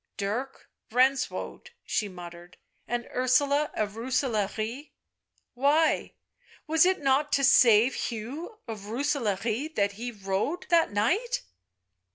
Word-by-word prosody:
" -, -, -53 dB
Dirk 225 Hz, +7 st, -4 dB, 0.2 s
Renswoude," 260 Hz, -, 0 dB, 0.2 s
she 210 Hz, -, -1 dB
muttered, 175 Hz, -1 st, -11 dB, 0.2 s
" -, -, -44 dB
and 240 Hz, 0 st, -3 dB
Ursula 280 Hz, +4 st, +2 dB
of 210 Hz, -1 st, -1 dB
Rooselaare 235 Hz, +1 st, -2 dB, 0.4 s
— -, -, -44 dB
why 305 Hz, +3 st, +2 dB, 0.2 s
— -, -, -28 dB
was 320 Hz, +3 st, +4 dB
it 375 Hz, -3 st, +1 dB
not 275 Hz, +2 st, +2 dB
to 275 Hz, -, +2 dB
save 245 Hz, -3 st, +6 dB
Hugh 265 Hz, -, -5 dB
of 210 Hz, -3 st, -7 dB
Roose 255 Hz, +8 st, 0 dB
laare 230 Hz, +2 st, -2 dB
that 200 Hz, -1 st, +2 dB
he 235 Hz, +4 st, -6 dB
rode 205 Hz, -, -3 dB
— -, -, -35 dB
that 335 Hz, -1 st, +4 dB
night?" 365 Hz, -, 0 dB
250 Hz, 140 wpm, -27 LUFS, 210-285 Hz, 0.4 s, save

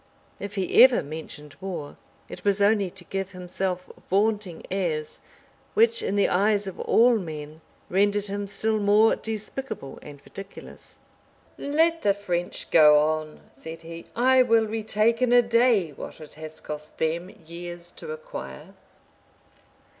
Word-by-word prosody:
If 200 Hz, +1 st, -6 dB
he 190 Hz, -2 st, +4 dB
ever 255 Hz, -1 st, +5 dB
mentioned 150 Hz, -1 st, -8 dB
war, 170 Hz, -7 st, -5 dB, 0.3 s
it -, -, -10 dB
was 200 Hz, 0 st, +2 dB
only 200 Hz, -1 st, +3 dB
to 185 Hz, +1 st, -12 dB
give 195 Hz, +2 st, -4 dB
himself 180 Hz, 0 st, -3 dB, 0.2 s
vaunting 205 Hz, -3 st, 0 dB
airs, 160 Hz, -6 st, -2 dB, 0.6 s
which, 460 Hz, +2 st, +4 dB
in 195 Hz, -, -1 dB
the 200 Hz, -, +3 dB
eyes 205 Hz, +2 st, +2 dB
of 190 Hz, -, -7 dB
all 235 Hz, 0 st, +4 dB
men, 155 Hz, -3 st, -7 dB, 0.3 s
rendered 205 Hz, +2 st, +2 dB
him 200 Hz, 0 st, -3 dB
still 215 Hz, +2 st, 0 dB
more 210 Hz, +2 st, +4 dB
despicable 220 Hz, -, -6 dB
and 145 Hz, -1 st, -11 dB
ridiculous. 195 Hz, 0 st, -11 dB, 0.6 s
"Let 325 Hz, +3 st, +1 dB
the 200 Hz, -1 st, +3 dB
French 175 Hz, -3 st, -4 dB
go 150 Hz, -2 st, +7 dB
on," 155 Hz, 0 st, 0 dB
said 160 Hz, 0 st, -9 dB
he; 165 Hz, 0 st, -10 dB
"I 255 Hz, +2 st, +5 dB
will 230 Hz, -2 st, +4 dB
retake 220 Hz, +1 st, 0 dB
in 250 Hz, -1 st, +3 dB
a 245 Hz, 0 st, +6 dB
day 230 Hz, -7 st, +3 dB
what 140 Hz, -, -9 dB
it 155 Hz, -1 st, -11 dB
has 155 Hz, 0 st, -8 dB
cost 150 Hz, 0 st, -8 dB
them 165 Hz, +3 st, -1 dB
years 175 Hz, 0 st, -9 dB
to 470 Hz, -, -9 dB
acquire." 485 Hz, +1 st, -8 dB
195 Hz, 145 wpm, -25 LUFS, 165-220 Hz, 0.6 s, go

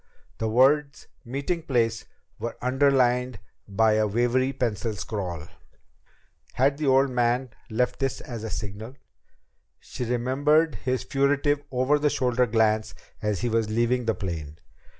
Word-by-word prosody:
The 110 Hz, -, -1 dB
words 140 Hz, +5 st, +3 dB, 0.2 s
"meeting 140 Hz, +7 st, -3 dB
place" 115 Hz, -7 st, 0 dB, 0.3 s
were 115 Hz, -, -5 dB
underlined 125 Hz, -2 st, +2 dB, 0.3 s
by 110 Hz, +2 st, +3 dB
a 110 Hz, 0 st, +2 dB
wavery 120 Hz, +5 st, +1 dB
pencil 115 Hz, -4 st, -2 dB
scrawl! 95 Hz, -6 st, -4 dB, 1.1 s
Had 140 Hz, +3 st, +1 dB
the 150 Hz, -, -1 dB
old 135 Hz, 0 st, +4 dB
man 125 Hz, +1 st, 0 dB, 0.2 s
left 125 Hz, +2 st, -1 dB
this 135 Hz, -1 st, -1 dB
as 115 Hz, -3 st, -7 dB
a 110 Hz, -, -4 dB
signal? 110 Hz, +5 st, -6 dB, 0.8 s
She -, -, -7 dB
remembered 140 Hz, +7 st, +2 dB
his 130 Hz, -1 st, -1 dB
furtive 140 Hz, +1 st, +1 dB
over 130 Hz, +3 st, +2 dB
the 150 Hz, 0 st, +2 dB
shoulder 125 Hz, -2 st, +1 dB
glance 110 Hz, -1 st, +1 dB, 0.3 s
as 105 Hz, -3 st, -1 dB
he 120 Hz, -, 0 dB
was 110 Hz, -1 st, 0 dB
leaving 120 Hz, +2 st, +1 dB
the 115 Hz, -2 st, +1 dB
plane. 80 Hz, -6 st, -5 dB
125 Hz, 135 wpm, -25 LUFS, 110-135 Hz, 1.1 s, old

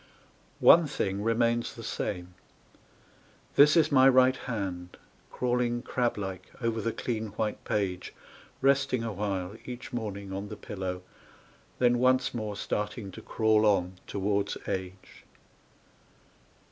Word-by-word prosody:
One 165 Hz, -1 st, +7 dB
thing 100 Hz, -6 st, -2 dB
remains 115 Hz, +1 st, +1 dB
the 115 Hz, -, -9 dB
same 90 Hz, -5 st, -4 dB, 1.2 s
this 150 Hz, +4 st, +6 dB
is 160 Hz, -, +4 dB
my 135 Hz, -1 st, +7 dB
right 130 Hz, 0 st, +5 dB
hand 95 Hz, -9 st, -5 dB, 0.3 s
Crawling 120 Hz, -1 st, 0 dB
crab 120 Hz, -3 st, -1 dB
like 95 Hz, -2 st, -5 dB
over 115 Hz, -2 st, -1 dB
the 115 Hz, -, -1 dB
clean 110 Hz, -1 st, -3 dB
white 110 Hz, -1 st, -2 dB
page, 95 Hz, -4 st, -2 dB, 0.5 s
Resting 135 Hz, -3 st, +2 dB
awhile 100 Hz, -3 st, -3 dB
each 125 Hz, +1 st, -8 dB
morning 100 Hz, -4 st, -4 dB
on 100 Hz, +2 st, -4 dB
the 105 Hz, -, -7 dB
pillow, 95 Hz, -2 st, -5 dB, 0.7 s
Then 120 Hz, -1 st, +3 dB
once 130 Hz, +1 st, +3 dB
more 110 Hz, -3 st, -4 dB
starting 105 Hz, 0 st, -3 dB
to -, -, -10 dB
crawl 110 Hz, -1 st, +2 dB
on 95 Hz, -3 st, +2 dB
towards 100 Hz, 0 st, -1 dB
age. 95 Hz, 0 st, -6 dB
110 Hz, 120 wpm, -29 LUFS, 95-120 Hz, 1.2 s, One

